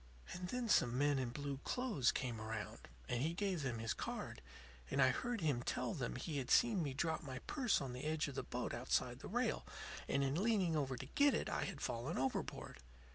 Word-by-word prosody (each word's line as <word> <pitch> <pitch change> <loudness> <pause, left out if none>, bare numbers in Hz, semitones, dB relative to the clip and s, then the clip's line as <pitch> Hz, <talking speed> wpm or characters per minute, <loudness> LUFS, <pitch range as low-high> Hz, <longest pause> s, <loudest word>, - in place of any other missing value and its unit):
"And 180 0 -4
then 250 +4 -1
some 125 - +4
men 145 0 +3
in 130 -2 -1
blue 140 +1 -3
clothes 215 - +2
came 120 -5 -2
around; 110 -1 -5 0.2
and 120 0 0
he 160 +4 0
gave 190 -4 0
them 125 -4 -1
his 115 0 -1
card, - - -4 0.5
and 140 - 0
I 130 -1 +7
heard 235 - -1
him 145 -7 +2
tell - - -1
them 60 - -2
he 150 - -2
had 130 - -4
seen 225 -6 +5
me 140 -4 -2
drop 160 +3 0
my 135 -5 -5
purse 255 -5 +2
on 130 -3 -4
the 125 - -5
edge 155 0 +1
of 140 - -5
the - - -2
boat - - -3
outside - - 0
the - - -7
rail, - - 0 0.4
and 140 - +2
in 140 +6 +1
leaning 200 -7 +3
over 135 -4 0
to 130 - -5
get 285 - +4
it - - -1
I - - 0
had 165 -8 -5
fallen 120 +8 -2
overboard. 130 - -2
140 Hz, 220 wpm, -39 LUFS, 130-180 Hz, 0.5 s, I